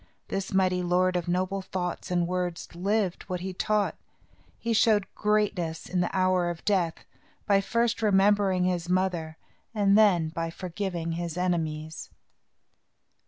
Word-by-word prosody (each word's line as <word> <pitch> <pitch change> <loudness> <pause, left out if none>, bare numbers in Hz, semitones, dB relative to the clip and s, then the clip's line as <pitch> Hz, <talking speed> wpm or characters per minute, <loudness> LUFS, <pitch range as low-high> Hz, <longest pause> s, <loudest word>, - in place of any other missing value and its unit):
This 195 0 -3
mighty 185 -1 +2
lord 180 +1 +2
of 175 -1 -1
noble 185 +2 0
thoughts 180 -2 -4
and 175 -1 +1
words 180 -1 -3
lived 195 +1 0
what 180 -1 -3
he 190 0 -4
taught. 210 +2 0 0.6
He 230 0 -1
showed 215 -2 +4
greatness 205 -6 0
in 180 -1 0
the 175 - 0
hour 185 -2 +2
of 170 -1 -6
death, 180 -6 0 0.4
by 200 -1 +4
first 230 +3 0
remembering 200 -2 +3
his 180 -1 -1
mother, 180 -4 0 0.4
and 200 -1 +4
then 190 -7 +4
by 165 0 -3
forgiving 175 -1 -4
his 170 0 -4
enemies. 160 -3 -2
185 Hz, 140 wpm, -27 LUFS, 175-195 Hz, 0.6 s, showed